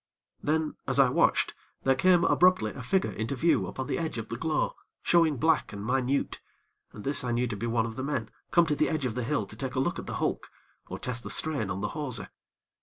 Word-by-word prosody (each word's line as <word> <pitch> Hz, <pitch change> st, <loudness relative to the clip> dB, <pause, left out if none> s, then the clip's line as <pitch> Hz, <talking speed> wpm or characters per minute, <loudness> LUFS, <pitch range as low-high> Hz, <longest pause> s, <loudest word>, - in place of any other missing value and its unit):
Then, 155 Hz, +1 st, 0 dB
as 135 Hz, +1 st, +1 dB
I 135 Hz, -2 st, +6 dB
watched, -, -, +2 dB, 0.3 s
there 135 Hz, -, +4 dB
came, 175 Hz, +6 st, +4 dB
abruptly 180 Hz, -14 st, +4 dB
a -, -, -8 dB
figure 190 Hz, +9 st, +1 dB
into 110 Hz, +5 st, -3 dB
view 165 Hz, +6 st, +2 dB
upon 130 Hz, -, -4 dB
the 140 Hz, -, -2 dB
edge 160 Hz, -6 st, -3 dB
of 115 Hz, -1 st, -5 dB
the 115 Hz, -, -3 dB
glow, 155 Hz, +5 st, 0 dB, 0.3 s
showing 165 Hz, -4 st, +4 dB
black 160 Hz, +5 st, +2 dB
and 100 Hz, 0 st, -6 dB
minute, 130 Hz, +3 st, 0 dB, 0.5 s
and 105 Hz, -, -10 dB
this 140 Hz, -1 st, +2 dB
I 125 Hz, -, -1 dB
knew 120 Hz, +1 st, +1 dB
to 110 Hz, -, -3 dB
be 110 Hz, +4 st, -3 dB
one 115 Hz, -1 st, +1 dB
of 115 Hz, +1 st, -6 dB
the 130 Hz, -, -3 dB
men 140 Hz, -6 st, -2 dB, 0.2 s
come 170 Hz, -1 st, +5 dB
to 150 Hz, -2 st, 0 dB
the -, -, +2 dB
edge 155 Hz, -4 st, -1 dB
of 120 Hz, -, -1 dB
the 125 Hz, +1 st, -2 dB
hill 115 Hz, -3 st, 0 dB
to 100 Hz, -, -9 dB
take 130 Hz, +3 st, -4 dB
a -, -, +1 dB
look 130 Hz, -, 0 dB
at -, -, -8 dB
the -, -, -4 dB
hulk, -, -, -2 dB, 0.4 s
or -, -, -5 dB
test 120 Hz, -1 st, -4 dB
the -, -, -6 dB
strain 145 Hz, -11 st, 0 dB
on 95 Hz, +1 st, -3 dB
the 105 Hz, -, -1 dB
hawser. 140 Hz, -5 st, -4 dB
130 Hz, 245 wpm, -28 LUFS, 115-155 Hz, 0.5 s, I